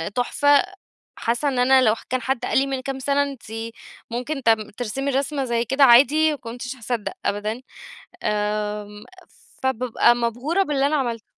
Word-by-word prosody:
تحفة، 285 +3 +3 0.5
حاسة 240 +5 -1
إن 265 -3 0
أنا 260 +1 +5
لو 220 -3 +3
كان 255 0 -1
حد 250 -1 -2
قال - - 0
لي 275 - 0
من 270 -1 -3
كام 270 +1 -5
سنة 280 +2 +1
أنتِ 275 -3 -7 0.7
ممكن 255 +4 -4
ت 230 - +3 0.3
ترسمي 255 +4 -3
الرسمة 275 +1 -1
زي 235 -1 0
كده 270 +4 +2
عادي 285 +5 +6
ما 295 - -4
كنتش 245 +1 -7
هاصدق 235 -2 -4
أبدًا، 210 +4 -2 0.6
آمم 210 0 -2 0.6
فبابقى 245 -2 +2
مبهورة 245 - 0
باللي 280 -5 +1
أنا 305 - 0
عملته. 235 -6 -2
250 Hz, 160 wpm, -22 LUFS, 230-275 Hz, 0.7 s, عادي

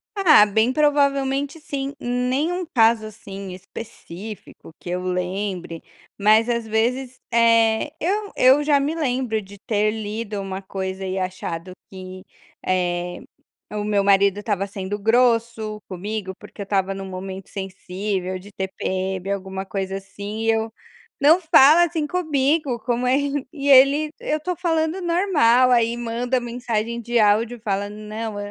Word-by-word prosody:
Ah, 330 - +7
bem 220 +4 +2
provavelmente, 280 0 +1
sim. 280 -2 -4
Nenhum 265 +9 -1
caso, 225 -6 +3
assim, 195 -3 -8
específico 195 -1 -10
que 175 - -9
eu 180 +1 -2
lembre, 180 -1 -3 0.4
mas, 215 +3 +4
às 235 -1 -1
vezes, 245 +4 -1 0.2
eh, 230 +3 +3
eu 405 +4 -1
eu 265 +3 +5
já 290 -1 +4
me 285 +3 -1
lembro 255 -8 -1
de 200 0 -13
ter 210 +1 0
lido 215 -1 -4
uma 195 0 -5
coisa 190 0 -5
e 190 0 -3
achado 185 -2 -4 0.2
que, 185 -1 -9 0.4
eh, 175 -1 -1 0.5
o 210 -1 -2
meu 205 -1 +1
marido 200 0 +4
estava 205 -2 -1
sendo 195 +1 -5
grosso 230 -1 +1
comigo, 195 +1 -5
porque - - -11
eu - - -2
estava 195 -1 0
num 195 0 -6
momento 190 0 -7
sensível, 190 -1 -4
de 195 +3 -13
TPM, 190 0 -3
alguma 190 -1 -4
coisa 195 0 -3
assim 200 +2 -7
e 225 - +3
eu: 225 0 -1 0.5
"Não 310 +5 +6
fala 320 0 +6
assim 320 -2 -2
comigo, 295 -5 0
como 245 +1 -1
é", 255 - +4 0.4
e 285 -2 -2
ele: 280 +3 +6
"Eu 305 0 -2
tô 360 +2 -3
falando 325 0 0
normal". 335 -9 +3
Aí 235 -1 +3
manda 240 +2 -1
mensagem 235 -1 -3
de 240 +1 -1
áudio 220 +2 +3
e - - -22
fala: 205 -2 -2
"Não, 215 +1 -6
220 Hz, 145 wpm, -22 LUFS, 195-265 Hz, 0.5 s, Ah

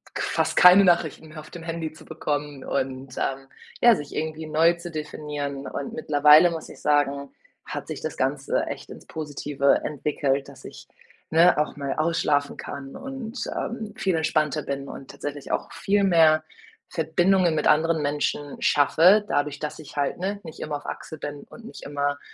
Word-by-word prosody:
k - - -2
fast - - 0
keine 185 +2 +8
Nachrichten 170 -3 +1
mehr 155 0 -9
auf 155 - -14
dem 170 - -9
Handy 165 -1 -4
zu 155 0 -15
bekommen 145 -3 -4
und, 130 -1 -3
ähm 135 0 -2 0.3
ja, 235 -2 +7
sich 145 -1 -8
irgendwie 155 0 -3
neu 160 +3 +4
zu 170 0 -8
definieren. 150 -2 -5
Und 140 - -5
mittlerweile 150 +3 +6
muss 165 -1 -6
ich - - -13
sagen, 140 -1 +1 0.3
hat - - -6
sich - - -5
das - - -4
Ganze - - 0
echt - - -7
ins - - -12
Positive 145 -2 0
entwickelt, 140 -1 -1
dass 130 -2 -14
ich, - - -11 0.4
ne, 170 +1 +5
auch 150 - 0
mal 140 -1 -2
ausschlafen 155 -3 0
kann 135 -1 -7
und, 265 -3 -7 0.2
ähm, 220 -3 -4
viel 190 -3 0
entspannter 155 -1 +1
bin 140 0 -4
und 135 - -9
tatsächlich 145 -1 -6
auch - - -2
viel 200 +1 +1
mehr 160 -4 +5 0.5
Verbindungen 175 +1 +2
mit 150 - +1
anderen 160 +1 +3
Menschen 145 0 -2
schaffe, 165 +8 +5
dadurch, 145 0 0
dass 150 0 -5
ich 150 -1 -12
halt, 140 +2 -1
ne, 200 +3 -2
nicht 160 - -10
immer 150 - -4
auf - - -15
Achse 155 - -7
bin 145 0 -6
und 235 - -13
nicht - - -10
immer, 145 0 -2
150 Hz, 175 wpm, -25 LUFS, 145-170 Hz, 0.5 s, keine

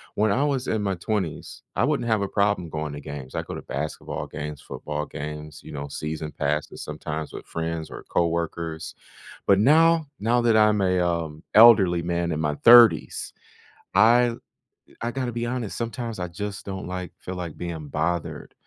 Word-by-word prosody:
When 105 0 +2
I 135 +8 +2
was 135 -3 0
in 110 -1 0
my 100 -2 0
20s, 90 -4 -4
I 105 - +2
wouldn't 140 -3 +1
have 110 -3 +2
a 100 - 0
problem 100 -3 0
going 75 -1 -4
to 75 - -7
games. 70 -2 -8
I'd - - -2
go - - -5
to - - -6
basketball 70 +4 -5
games, 75 -1 -6
football 75 0 -5
games, 75 +1 -7
you - - -10
know, 70 0 -5
season 75 +1 -5
passes 75 +1 -2
sometimes 75 +1 -5
with - - -8
friends 80 -1 -4
or - - -9
coworkers, 85 -1 -2 0.5
but 100 -1 +5
now 160 +6 +5
now 120 +3 +2
that 115 -2 +3
I'm 105 -1 +5
a, 90 -1 +2
um, 85 -3 -1
elderly 105 -6 +7
man 85 0 -1
in 75 - -2
my 75 -2 0
30s, 120 -1 +6 0.6
I've 115 +3 +5 0.6
I 120 +1 -1
gotta 130 -2 -2
be 120 +1 -3
honest, 120 -3 -3
sometimes 115 -1 -4
I 90 - -2
just 100 +4 -6
don't, 95 -2 -5
like, 90 -2 -5
feel 95 - -6
like 85 -3 -6
being 80 -4 -5
bothered 80 +3 -2
90 Hz, 180 wpm, -25 LUFS, 75-110 Hz, 0.6 s, elderly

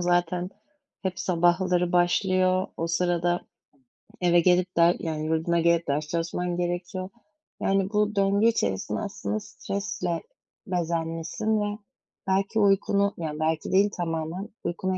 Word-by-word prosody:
zaten 175 +1 +1 0.5
hep 190 0 -2
sabahları 175 0 +2
başlıyor. 185 +1 +2
O 165 - -2
sırada 175 +1 +1 0.8
eve 175 -1 +5
gelip 180 +1 +2
der 170 +1 +5
yani, 155 -2 -3
yurduna 160 +2 +1
gelip 170 0 +2
ders 150 +2 -1
çalışman 175 +2 -2
gerekiyor, 175 +2 -3 0.5
yani, 195 0 +1
bu 210 0 +1
döngü 200 +2 +3
içerisinde 100 - 0
aslında 105 +1 -3
stresle 195 - -4 0.4
bezenmişsin 170 +5 -1
ve 205 0 -2 0.5
belki 195 +3 +1
uykunu, 200 0 +3
yani, 155 -2 -4
belki 155 0 -1
değil 200 +2 +4
tamamen 165 +2 -3
uykunu 185 +2 -2
175 Hz, 120 wpm, -26 LUFS, 165-190 Hz, 0.8 s, eve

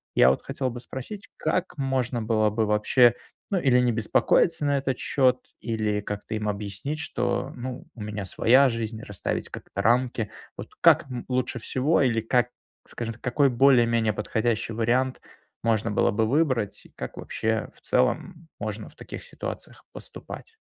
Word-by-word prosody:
Я 65 - +7
вот 65 - +1
хотел 135 -1 -2
бы 120 0 -6
спросить: 130 - -8
как 170 +3 -1
можно 130 -3 0
было 110 -1 +2
бы 110 +1 +1
вообще, 115 +3 +4 0.4
ну, 190 - +2
или 130 -5 +4
не 125 -1 +3
беспокоиться 120 +8 +2
на 145 0 +2
этот 135 -1 -1
счёт, 130 -2 +3 0.2
или 110 -2 -1
как-то 105 +2 -5
им 105 -1 -1
объяснить, 105 +9 -4
что, 125 -5 -1
ну, 125 0 -6
у 115 - -10
меня 105 -1 -4
своя 130 +8 +4
жизнь, 115 -1 -4
расставить 105 -5 -3
как-то 100 - -6
рамки? 120 -1 +2 0.3
Вот - - -8
как, - - +6
м, 125 -1 -5
лучше 125 -1 0
всего, 135 +8 +1
или 120 -4 +2
как, 120 +2 +2 0.4
скажем, 115 -2 -5
какой 135 +3 +3
более-менее 120 -4 +4
подходящий 110 +1 -1
вариант 125 +4 +1 0.4
можно 115 -1 +1
было - - +2
бы 110 +2 +1
выбрать, 130 -6 0
и - - -16
как - - -7
вообще, 110 0 -2
в - - -23
целом, 165 - 0
можно - - -4
в - - -18
таких - - -9
ситуациях - - -7
поступать? 450 - -10
120 Hz, 160 wpm, -26 LUFS, 110-130 Hz, 0.4 s, Я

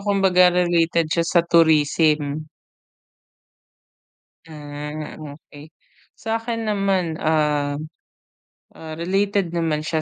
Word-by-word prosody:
kumbaga 195 -3 +3
related 175 -2 +1
siya 170 - +1
sa 175 - +4
tourism. 155 -2 +2 2.0
Ah, 150 0 -7
okay. 145 0 -12 0.5
Sa'kin 225 0 -3
naman, 195 -5 0
uhm, 150 -1 0 0.9
ah, 160 -1 -9
related 195 0 -1
naman 160 -3 -1
siya 160 0 -1
165 Hz, 85 wpm, -21 LUFS, 150-185 Hz, 2.0 s, sa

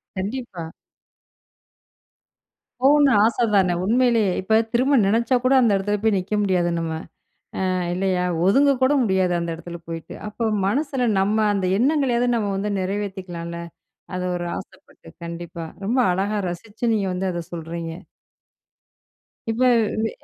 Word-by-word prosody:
கண்டிப்பா. 195 -4 -5 2.1
போகணும்னு 285 +1 +5
ஆச 230 +2 +3
தானே 190 -3 +4
உண்மையிலயே, 230 -1 +3
இப்ப 220 +4 +3
திரும்ப 265 +4 +3
நினைச்சா 230 +5 +2
கூட 255 +1 +3
அந்த 235 -3 +4
இடத்துல 205 +2 -1
போய் 220 -2 +3
நிக்க 185 +3 -4
முடியாது 180 -3 +1
நம்ம. 165 -1 -3 0.7
அ - - +1 0.2
இல்லையா, 185 -1 0 0.2
ஒதுங்க 275 +8 +5
கூட 260 +2 +4
முடியாது 190 -4 +1
அந்த 170 0 -3
இடத்துல 170 0 -9
போயிட்டு. 165 -1 -7
அப்போ 220 +2 -4 0.2
மனசுல 265 +2 0
நம்ம 205 +3 +1 0.2
அந்த 190 -2 0
எண்ணங்களையாவது 250 -2 +2
நம்ம 210 -3 -1
வந்து 205 +1 -2
நிறைவேத்திக்கலாம்ல. 185 -3 -4 0.5
அது 180 0 -3
ஒரு 175 0 -4
ஆசைப்பட்டு, - - -14 0.2
கண்டிப்பா. 170 0 -6 0.2
ரொம்ப 240 +5 +1
அழகா 200 +3 -1
ரசிச்சு 205 +6 -8
நீங்க 205 -3 0
வந்து 190 +1 -2
அத 175 - -3
சொல்றீங்க. 165 0 -5 1.6
இப்ப 225 +3 -3 0.4
வே 225 - +1
200 Hz, 130 wpm, -22 LUFS, 180-235 Hz, 2.1 s, போகணும்னு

